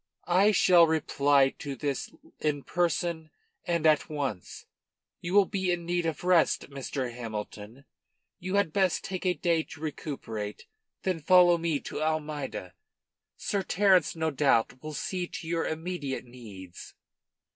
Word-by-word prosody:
"I 190 +4 +4
shall 180 -3 +6
reply 145 -3 +3
to 140 -2 -5
this 140 +1 -3 0.3
in 145 -2 -1
person 170 -2 -1 0.4
and 170 -2 0
at, 155 -1 +4
once. 135 - -4 0.5
You 175 +3 -3
will 205 -1 +7
be 190 -1 -1
in 175 -1 -2
need 175 -1 0
of 160 0 -4
rest, 180 -5 +2
Mr. 135 -2 -4
Hamilton. 110 +1 -7 0.5
You 185 +2 -3
had 200 -6 +2
best 190 -3 +1
take 185 -1 -4
a 180 - +2
day 170 -2 +1
to 155 - -11
recuperate, 125 -9 -5 0.4
then 185 -3 0
follow 175 +2 +5
me 165 -3 0
to - - -6
Almeida. 150 - -3 0.6
Sir 200 - -1
Terence 190 -3 +3
no 160 -1 -1
doubt 130 -3 +2
will 155 -1 -6
see 180 +3 -3
to 160 - -8
your 165 0 -1
immediate 160 -5 -4
needs." 105 -8 -11
160 Hz, 145 wpm, -28 LUFS, 135-175 Hz, 0.6 s, will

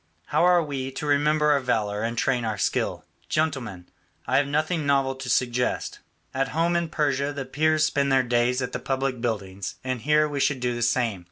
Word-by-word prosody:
How - - +1
are 180 -1 +5
we 135 -3 -4
to 150 - -5
remember 150 +1 +3
our 145 - +4
valour 110 -5 -1
and 115 +1 -2
train 125 0 +1
our 110 -2 -2
skill? - - -1 0.2
Gentlemen, 130 - -2 0.4
I - - +2
have 140 0 +2
nothing 155 +3 0
novel 135 -1 +2
to 130 -1 -7
suggest; 125 0 0 0.3
at 135 +1 0
home 170 +1 +2
in 170 -1 0
Persia 145 -2 0
the 140 -2 -5
Peers 155 +3 +2
spend 140 -1 0
their 130 -1 +4
days 120 +1 +1
at 125 - -4
the - - -3
public 135 -2 -2
buildings 100 -5 -3
and 130 -2 -3
here 150 +4 +3
we 145 -1 -4
should 140 -1 +1
do 125 0 -1
the 120 - -4
same. 115 -3 +1
135 Hz, 200 wpm, -25 LUFS, 120-150 Hz, 0.4 s, are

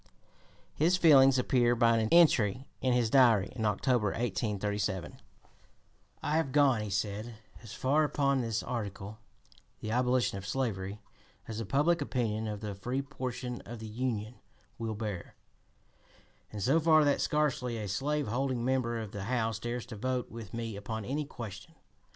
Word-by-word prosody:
His 170 +5 +3
feelings 135 -6 +6
appear 120 -1 +3
by 115 -1 +4
an 110 0 0
entry 130 - +4 0.2
in 130 - +2
his 120 -3 +1
Diary 115 -7 +4
in 110 -3 -2
October, 110 +2 +1
1837: 105 -3 -2 1.0
"I 150 +1 +1
have 160 -5 0
gone 135 -5 +4
[he 105 - -4
said] 105 +3 -3 0.3
as 115 -1 -10
far 145 +4 +2
upon 140 -2 +1
this 115 -2 -2
article, 105 -3 -5 0.6
the 110 - -5
abolition 125 -3 +1
of 95 - -9
slavery, 105 -6 -3 0.4
as 110 -1 -5
the 115 - -4
public 165 +5 +2
opinion 110 -3 -1
of 105 -1 -5
the 105 -2 -4
free 125 +8 -3
portion 125 -2 -5
of 120 - -8
the 110 - -8
Union 115 0 -3 0.4
will 110 -1 -3
bear, 105 -4 -5 1.2
and 105 -2 -5
so 140 - +4
far 155 -1 +5
that 145 -1 +2
scarcely 135 -6 0
a 105 -2 -4
slave 145 +9 -1
holding 125 +1 -1
member 125 -3 0
of 110 -3 -6
the 100 -2 -5
House 115 -3 -1
dares 120 +1 -4
to 115 - -8
vote 125 +3 -2
with 115 -4 -8
me 115 -2 -4
upon 105 +1 -5
any 145 +5 -2
question. 115 - -9
120 Hz, 160 wpm, -31 LUFS, 105-130 Hz, 1.2 s, feelings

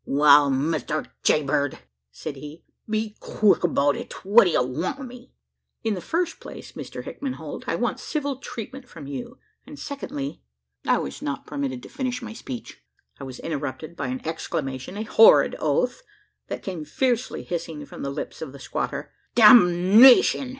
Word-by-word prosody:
"Wal, 145 0 +5
Mister 155 +3 -1 0.2
Jaybird," 145 -1 +1 0.3
said 145 - -7
he, 150 +4 -10 0.3
"be 215 0 -2
quick 210 -2 +2
'bout 145 -4 +2
it! - - -8
What 210 +3 +7
d'ye 175 - +2
want 140 - -2
wi' 275 - -7
me?" 250 0 -12 0.5
"In 220 -2 0
the 185 - -4
first 340 - -2
place - - -10
Mr - - -8
Hickman 275 -2 -5
Holt, - - -8
I - - 0
want - - -1
civil 285 -4 -3
treatment 255 0 -8
from 160 -4 -10
you; 235 - -7 0.3
and 295 - -10
secondly 145 - -6 0.2
" 65 0 -45
I - - +4
was 70 0 -5
not 140 -1 -4
permitted 265 -3 -4
to - - -11
finish 255 -2 -3
my 225 -1 -7
speech. 130 - -8 0.4
I - - -8
was 130 -1 -8
interrupted 155 +1 -5
by 140 -4 -3
an 130 +3 -5
exclamation 135 0 -4
a 215 - -2
horrid 460 - +6
oath - - 0 0.5
that - - -6
came 180 -5 -5
fiercely 245 - -1
hissing 165 -4 -5
from - - -10
the 140 - -3
lips 140 +2 -6
of 145 -4 -6
the 140 - -11
squatter. - - -4 0.2
"Damnation!" 215 +5 +7
175 Hz, 170 wpm, -24 LUFS, -, 0.5 s, What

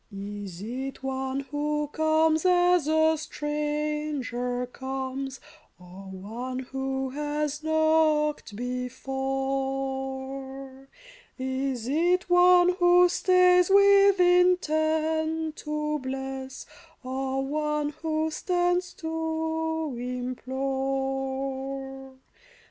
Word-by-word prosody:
Is 200 -2 -7
it 265 +4 -5
one 265 0 -2
who 295 +1 -2
comes 315 0 +2
as 355 -3 +4
a 315 0 +4
stranger 295 -5 -2
comes, 265 +1 -5 0.4
Or 180 +2 -12
one 225 +7 -6
who 265 0 -3
has 295 +1 -2
knocked 315 -5 +2
before? 270 +1 -4 0.5
Is 260 -2 -2
it 350 +6 +2
one 355 0 +6
who 355 0 +6
stays 360 0 +4
with 400 0 +6
intent 320 -3 +2
to 300 0 -2
bless, 265 0 -5 0.4
Or 265 +1 -2
one 300 +1 -1
who 315 0 -1
stands 355 +1 0
to 320 -2 -2
implore 270 +1 -3
275 Hz, 80 wpm, -27 LUFS, 265-315 Hz, 0.5 s, one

